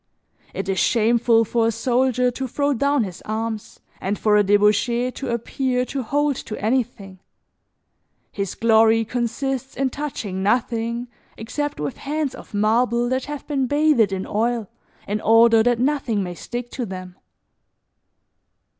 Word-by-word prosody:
It 195 - -3
is 190 -1 0
shameful 230 0 +3
for 230 +1 +1
a - - +2
soldier 250 +2 +1
to 265 +2 -4
throw 285 +3 0
down 280 0 +1
his 185 -3 -7
arms 220 0 -4 0.2
and 200 +2 -2
for 210 -1 +2
a 210 - +6
debauchee 210 +5 +2
to 275 - -6
appear 250 +2 -1
to 275 +1 -4
hold 285 +4 0
to 215 - -6
anything; 215 -4 -2 1.1
his 200 -2 -4
glory 225 0 +4
consists 250 +3 -3
in 265 -1 0
touching 230 -10 -4
nothing 235 +2 0 0.3
except 290 +6 -4
with 145 -2 -3
hands 295 -1 -2
of - - -12
marble 235 +3 +2
that 260 0 -1
have 295 0 -6
been 275 -3 -1
bathed 290 -7 +3
in 190 -1 -3
oil 230 0 -1 0.4
in 210 +1 -2
order 225 +1 +6
that 240 +1 +2
nothing 250 -5 0
may 180 -1 -5
stick 240 +7 -6
to 245 -3 -4
them. 185 -1 -8
235 Hz, 145 wpm, -22 LUFS, 215-260 Hz, 1.1 s, a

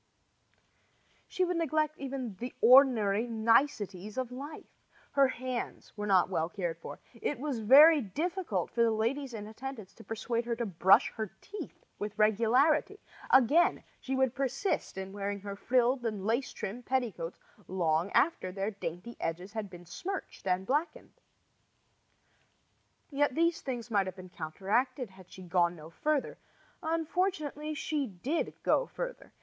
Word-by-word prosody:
She 370 - 0
would 355 -1 -1
even - - 0
neglect 275 - -2
the 245 +1 -5
ordinary 235 -4 +6
niceties 220 -3 +1
of 255 -2 -2
life. 280 +5 -8 0.5
Her 275 -1 +5
hands 255 -1 -5
were 210 0 -4
not 190 -3 +5
well 165 -3 -1
cared 175 -4 -3
for. - - -8
It 250 +5 -3
was 275 -4 -2
very 290 +8 +8
difficult 285 - -2
for 235 - 0
the 230 - +5
ladies 235 +4 -1
in 210 -1 -6
attendance 220 -1 -8
to 225 - -14
persuade 230 +1 -2
her 235 -1 -1
to 235 0 -2
brush 190 -1 +4
her 220 -2 -2
teeth 415 - -9
with 210 +1 -5
regularity. 240 - +3 0.3
Again, 280 +7 +5 0.2
she 265 - -3
would 265 -2 +2
persist 275 - -1
in 190 0 -5
wearing 200 0 -3
her 200 0 -6
frilled 250 +3 +2
and 210 -4 -3
lace 235 +5 0
trimmed 235 +5 -6
petticoats 225 -10 -2 0.3
long 170 -1 +1
after 275 - +2
their 195 +3 -2
dainty 185 +3 -6
edges 180 +4 -3
had 220 -3 -4
been 175 -1 -12
smirched 360 - -6
and 185 +1 +1
blackened. 310 - -2 2.0
Yet 285 -1 +1
these 335 +1 +2
things 245 -3 -5
might 200 -3 +2
have 185 - -5
been 185 -1 -11
counteracted 205 - -1
had 190 -1 -16
she 185 - -10
gone 175 -1 +2
no 160 0 -12
further. 300 - -1 0.4
Unfortunately, 320 -2 -1
she 295 -2 -1
did 245 - -3
go - - +3
further. - - -6
235 Hz, 150 wpm, -31 LUFS, 195-280 Hz, 2.0 s, very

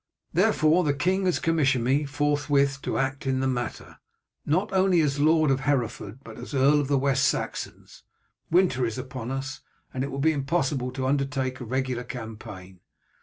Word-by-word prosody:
"Therefore 155 +4 +3
the 145 -3 +1
king 185 +6 +1
has 180 - +2
commissioned 140 -7 +1
me 135 +4 +2
forthwith 145 -1 +1
to - - -2
act 135 0 -2
in 130 -1 +1
the 135 - 0
matter, 120 -2 -4 0.5
not 185 +7 +1
only 190 -2 +3
as 145 -2 0
Lord 155 0 +4
of 135 - +1
Hereford 130 -3 -2
but 115 -3 -11
as 125 +3 -7
Earl 140 +3 +4
of 140 - -3
the 140 0 +2
West 135 0 +1
Saxons. - - -4 0.5
Winter 170 -7 +3
is 115 0 -2
upon 130 -2 -6
us, 135 0 -4 0.3
and 130 - -2
it 140 - -3
will 135 - -5
be 155 +3 +3
impossible 135 -3 -1
to 130 0 -3
undertake 135 -1 -1
a 125 - -6
regular 130 0 -2
campaign. 110 -6 -9
135 Hz, 175 wpm, -26 LUFS, 130-145 Hz, 0.5 s, Lord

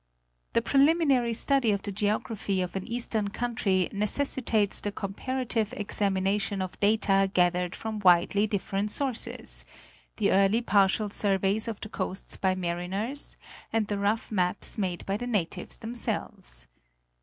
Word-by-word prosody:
The 230 - +2
preliminary 275 -4 +3
study 270 +1 +2
of 200 -1 -1
the 205 - -4
geography 205 -1 -1
of 180 0 -3
an 190 - -4
eastern 230 -3 -1
country 200 -4 0
necessitates 215 0 +1
the 205 - -2
comparative 225 +3 -3
examination 200 0 0
of 185 -1 -5
data 200 -2 +3
gathered 180 -1 +1
from 220 -1 -5
widely 190 +2 +4
different 200 0 -2
sources: 215 - 0 0.5
the - - +2
early 200 +5 +3
partial 205 0 +2
surveys 200 +2 +1
of 225 -3 -4
the 215 - -6
coasts 190 -2 -1
by 190 -2 0
mariners, 185 +9 -2 0.3
and 225 -1 +1
the 205 0 -3
rough 210 +3 -1
maps 185 -2 +1
made 180 -4 -2
by 195 +1 -1
the 245 +2 -5
natives 200 -9 -1
themselves. 220 - -4
205 Hz, 135 wpm, -28 LUFS, 190-225 Hz, 0.5 s, widely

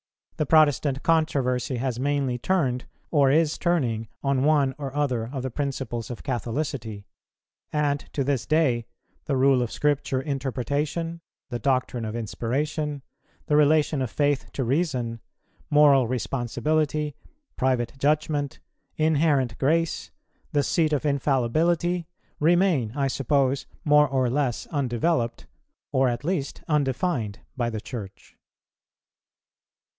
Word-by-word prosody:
The 155 - 0
Protestant 145 -3 +3
controversy 135 -6 +1
has 125 -1 -2
mainly 135 -2 0
turned, 130 -6 0 0.3
or 140 -4 +4
is 155 +2 +2
turning, 125 -11 0 0.2
on 135 -1 +1
one 145 -3 +3
or 140 -2 -4
other 130 -6 0
of 135 -3 -4
the 130 - -3
principles 130 -4 -3
of 120 - -7
Catholicity; 120 -4 -3 0.7
and 145 -1 +1
to 140 - 0
this 135 -3 -1
day 130 -7 +2 0.4
the 140 - 0
rule 130 -1 +4
of 120 - -2
Scripture 145 -2 0
Interpretation, 145 +4 -2 0.3
the 120 - -2
doctrine 125 -2 0
of 110 +1 -4
Inspiration, 140 +6 -2 0.4
the 150 - +1
relation 150 -1 +3
of 130 - -1
Faith 145 +1 0
to 135 - -1
Reason, 125 -4 -1 0.5
moral 145 -4 +5
responsibility, 145 +5 -1 0.4
private 125 -3 0
judgment, 145 -1 0 0.4
inherent 150 -6 +2
grace, 165 +4 +1 0.4
the 145 - +2
seat 155 +1 +1
of 150 +1 0
infallibility, 155 +5 +1 0.3
remain, 165 - +3
I 140 -1 +1
suppose, 135 0 +1 0.2
more 150 0 +6
or 130 -2 +1
less 135 -3 0
undeveloped, 125 -3 0 0.5
or, 130 -2 +3
at 120 +2 -3
least, 155 -4 -2
undefined, 135 - 0
by 120 -2 0
the 110 -2 -4
Church. 100 -8 -9
140 Hz, 120 wpm, -25 LUFS, 125-150 Hz, 0.7 s, more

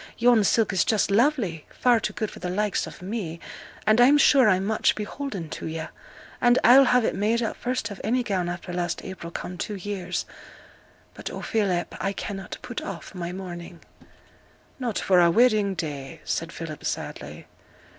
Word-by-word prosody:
Yon 235 -2 +5
silk 215 +1 +2
is 185 - +3
just 210 -2 +1
lovely, 215 - +2
far 245 -2 +3
too - - -2
good 215 - -3
for - - -11
the 180 - -4
likes 205 +2 0
of - - -11
me, 185 -5 -4 0.5
and 215 +2 +5
I'm 275 +4 +7
sure 270 -5 +6
I'm 190 0 +2
much 215 +1 +2
beholden 210 - -5
to - - -6
yo'; 160 0 -5 0.5
and 245 0 +5
I'll 260 +4 +8
have 250 -2 +3
it - - +1
made 225 +4 +1
up 225 - -2
first 245 -3 -3
of 200 - -8
any 245 +4 +1
gown 185 -6 -1
after 175 0 -6
last 175 0 -2
April 190 -3 -7
come 180 +1 -6
two 210 - -3
years, 190 -2 -4 0.9
but, - - -7
oh, - - -7
Philip, 195 -6 0
I 195 - -1
cannot 195 -1 -6
put 245 -2 -5
off 175 -5 -7
my 175 -2 -4
mourning!' 175 -2 -8 1.0
'Not 240 -6 -2
for 185 -2 +3
our 170 -1 +6
wedding 215 -1 +3
day!' 145 -5 -5
said 165 0 -2
Philip, 165 -3 -7
sadly. - - -5
200 Hz, 180 wpm, -25 LUFS, 175-230 Hz, 1.0 s, I'll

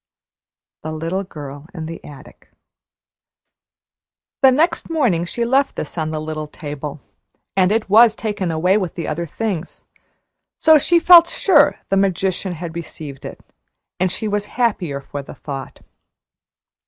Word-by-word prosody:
"THE 155 - -5
LITTLE 165 +5 -3
GIRL 145 -2 -9
IN 160 -2 -5
THE 165 +1 -8
ATTIC." 145 -2 -14 1.9
The 265 - +8
next 310 +7 +1
morning 240 - +1
she 235 +7 -2
left 270 +3 +2
this 150 - -6
on 160 -2 -2
the 155 -1 -3
little 155 0 -5
table, 150 -1 -7 0.5
and 185 0 +3
it 220 0 0
was 220 +2 +6
taken 205 -5 -3
away 175 +5 +2
with 185 -5 -3
the 170 - -4
other 170 +2 -3
things; 190 -2 -4 0.7
so 315 -1 +6
she 340 +4 +3
felt 340 0 +8
sure 295 -7 +4
the 195 - +2
magician 190 -1 0
had 165 0 -7
received 150 -4 -8
it, - - -8 0.6
and 185 0 +1
she 215 - -3
was 205 0 -1
happier 185 - 0
for 140 +1 -7
the 135 - -11
thought. 135 -3 -8
180 Hz, 145 wpm, -20 LUFS, 155-225 Hz, 1.9 s, The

